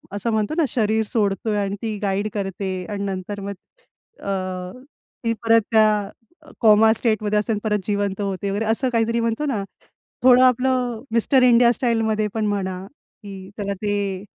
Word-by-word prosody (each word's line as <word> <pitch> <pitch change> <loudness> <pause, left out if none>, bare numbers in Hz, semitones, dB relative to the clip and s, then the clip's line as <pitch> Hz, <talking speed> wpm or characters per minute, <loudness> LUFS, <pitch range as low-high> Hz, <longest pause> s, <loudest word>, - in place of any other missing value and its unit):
असं 215 +3 -2
म्हणतो 215 +3 0
ना, 335 - +3
शरीर 220 -1 +1
सोडतोय 210 -1 0
आणि 200 -1 -1
ती 220 -2 -3
गाईड 200 0 -1
करते 195 -1 -3
आणि 205 -1 -3
नंतर 195 +1 -4
मग 200 +1 -5 0.7
अ, - - -5 0.9
ती 230 - +1
परत 225 0 +5
त्या 215 -2 +3 0.5
कॉमा 220 -1 +6
स्टेटमध्ये 215 -2 0
असते 210 +2 -1
आणि 210 - -2
परत 210 -1 +1
जिवंत 205 -1 -1
होते 195 -1 -2
वगैरे 205 +3 -1
असं 225 +4 +1
काहीतरी 230 0 +1
म्हणतो 230 +6 -1
ना, 230 -8 -1 0.6
थोडं 255 0 +7
आपलं 250 -2 +2
मिस्टर 245 +3 +3
इंडिया 240 -1 +6
स्टाईलमध्ये 225 -3 0
पण 220 -1 0
म्हणा 190 -3 -2
की 195 -6 -13
त्याला 200 -1 -3
ते 200 -2 -2
215 Hz, 160 wpm, -22 LUFS, 200-230 Hz, 0.9 s, थोडं